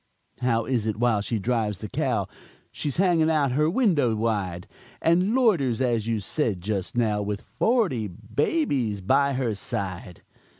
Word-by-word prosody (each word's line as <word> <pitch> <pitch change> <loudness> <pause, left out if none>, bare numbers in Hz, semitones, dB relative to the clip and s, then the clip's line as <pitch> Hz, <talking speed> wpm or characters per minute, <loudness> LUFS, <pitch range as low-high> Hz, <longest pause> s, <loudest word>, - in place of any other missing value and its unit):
"How 115 -2 +1
is 120 -5 -1
it 110 - -1
while 115 -3 +2
she 115 +2 -2
drives 110 -1 -1
the 105 - -6
cow - - -1 0.4
She's 145 -3 -3
hanging 170 -4 +3
out 150 -4 +2
her 150 +4 +2
window 165 - +2
wide, 100 -6 -2 0.3
And 180 +7 +2
loiters, 170 - +2
as 115 -4 0
you 115 -2 0
said 110 - 0
just 100 +4 -3
now, 105 -3 +1
With 105 0 -3
forty 200 - 0
babies 130 - -1
by 140 +9 +2
her 125 -4 -1
side?" 95 -3 -5
120 Hz, 155 wpm, -25 LUFS, 105-150 Hz, 0.4 s, hanging